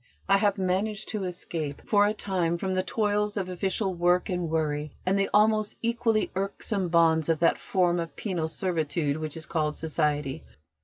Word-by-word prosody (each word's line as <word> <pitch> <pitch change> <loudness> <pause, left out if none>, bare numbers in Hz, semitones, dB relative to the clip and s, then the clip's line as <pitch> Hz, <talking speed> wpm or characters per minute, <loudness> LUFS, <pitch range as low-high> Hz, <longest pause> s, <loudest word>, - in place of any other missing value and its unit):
I 195 - +5
have 205 0 +2
managed 195 +3 -1
to 210 -3 -2
escape 165 -5 -4
for 205 -1 +4
a 210 - +1
time 180 -5 -1
from 190 +2 -2
the 185 - +2
toils 210 +2 0
of 190 -2 -2
official 190 +2 -1
work 175 +2 +2
and 180 -3 -1
worry, 150 -2 -1
and 185 +1 +2
the 195 - +1
almost 215 0 +3
equally 230 -1 +1
irksome 195 0 -2
bonds 165 -2 +3
of 165 - +3
that 170 - +3
form 175 -2 +1
of 165 -1 -5
penal 180 -6 -2
servitude 160 -3 -1
which 155 0 -5
is 160 - -7
called 155 -2 -1
Society. 150 -2 -1
180 Hz, 175 wpm, -27 LUFS, 160-200 Hz, -, I